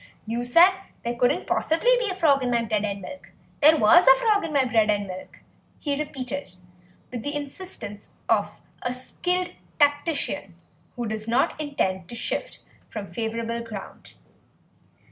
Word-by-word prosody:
"You 230 +2 -2
said 335 +10 +7 0.3
there 235 - -1
couldn't 245 +1 +1
possibly 330 +11 +2
be 475 -4 -1
a 375 - -3
frog 295 -7 +3
in 250 - 0
my 235 -1 +2
bread 215 -2 0
and 200 -1 -4
milk; 280 +9 -9 0.3
there 310 +2 +7
was 305 - +6
a - - +10
frog 440 -5 +2
in 325 - -3
my 280 -3 +3
bread 225 -4 +2
and 205 -1 +1
milk," 185 -1 -9 0.4
he 285 -2 -2
repeated, 280 - -5 0.6
with 245 -2 -4
the 290 +5 -3
insistence 285 - -7 0.2
of 205 -2 +1 0.2
a 245 0 -2
skilled 360 +8 -2 0.3
tactician 290 +1 +1 0.4
who 240 -2 -3
does 215 0 -4
not 240 +6 +1
intend 190 - -2
to - - -7
shift - - -4 0.3
from 205 -3 -7
favourable 230 0 -3
ground. 220 -4 -9
245 Hz, 160 wpm, -25 LUFS, 220-305 Hz, 0.6 s, a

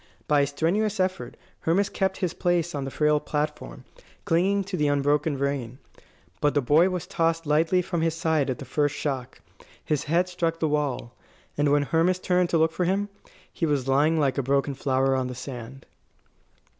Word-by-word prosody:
By 145 -1 +4
a 140 - +2
strenuous 190 +9 0
effort 185 0 -2 0.2
Hermas 190 +5 +1
kept 190 -2 -1
his 170 - -3
place 175 -1 0
on 140 -2 -3
the - - -4
frail 150 +2 +2
platform, 150 - -4 0.4
clinging 195 +4 +2
to 195 0 -5
the 150 -4 +1
unbroken 145 +1 +1
rein. 135 -3 -2 0.6
But 145 0 +1
the - - +4
boy 155 +8 +4
was 180 -3 -3
tossed 165 0 0
lightly 160 +5 +2
from 170 -1 -2
his 165 0 0
side 160 -4 0
at 130 - -2
the 140 - -8
first 145 +2 0
shock. 135 -5 -4 0.4
His 150 -3 -1
head 175 +4 +2
struck 170 -2 -2
the 160 - +1
wall. 145 -5 -2 0.4
And 145 -1 +2
when 145 0 +3
Hermas 165 +5 +2
turned 180 -1 +1
to 165 - +2
look 160 0 +3
for 180 - -1
him, 200 +3 0 0.4
he 165 - -1
was 140 -3 0
lying 150 +4 +3
like 140 -2 +1
a - - +2
broken 140 +2 0
flower 135 0 +1
on 130 -1 -1
the 125 - -6
sand. 130 0 -8
150 Hz, 190 wpm, -25 LUFS, 140-175 Hz, 0.6 s, By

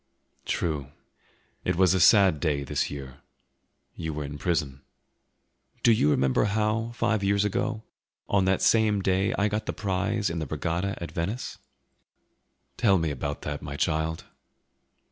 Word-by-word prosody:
"True; 75 -5 -1 0.8
it 90 - 0
was 95 0 +4
a 95 - +2
sad 95 -5 +6
day, 75 -3 0
this 70 - -1
year; 65 -2 -8 0.8
you 80 -3 -5
were 75 - -3
in 75 +1 -7
prison." 70 -5 -1 1.0
"Do 120 - +6
you 110 -9 +3
remember 65 +4 +2
how, 110 +2 0
five 115 -3 0
years 100 +1 +2
ago, 105 +2 -1 0.4
on 95 -2 +2
that 95 0 +1
same 105 0 +3
day 95 +1 +2
I 100 - +2
got 105 +1 -3
the - - -1
prize 100 0 -1
in 85 - -3
the 80 - -4
regatta 85 +6 -2
at 85 - -6
Venice?" 100 +9 -4 1.2
"Tell 100 -5 +4
me 80 -3 0
about 70 +1 -4
that, 75 0 -4
my 70 -2 -6
child." 80 +1 -1
90 Hz, 150 wpm, -27 LUFS, 75-105 Hz, 1.2 s, sad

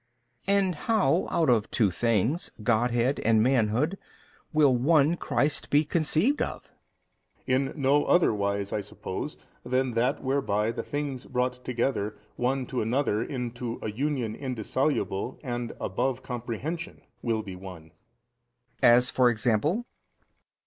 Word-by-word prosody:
B. 200 - +4
And 195 -2 +2
how 190 0 +1
out 165 - +1
of 110 -3 +2
two 105 -5 +2
things, 115 - 0
Godhead 120 +4 +2
and 110 -1 +3
manhood, 125 - +1 0.5
will 145 -5 +4
One 150 +5 +4
Christ 150 -3 -1
be 150 +2 +4
conceived 170 - +1
of? - - -4 0.8
A. - - -1
In 135 +1 +1
no 140 0 +2
other 175 -9 +4
wise 100 -1 -1
(I 105 - 0
suppose) 95 - -6 0.3
than 130 0 0
that 120 +4 0
whereby 125 -6 0
the - - -4
things 145 -3 -4
brought 125 0 -1
together 120 -4 -1 0.2
one 130 +1 0
to 125 0 -2
another 115 -1 +1
unto 120 -2 -4
a 110 - -2
union 130 -2 -1
indissoluble 125 -3 -2
and 120 -3 -3
above 130 +7 -1
comprehension 125 +8 -5 0.2
will 115 -2 -1
be 95 -3 -7
One. 90 -4 -10
B. - - -29 0.9
As 125 +1 +6
for 125 -1 +4
example? 120 - +1
125 Hz, 135 wpm, -27 LUFS, 110-145 Hz, 0.9 s, As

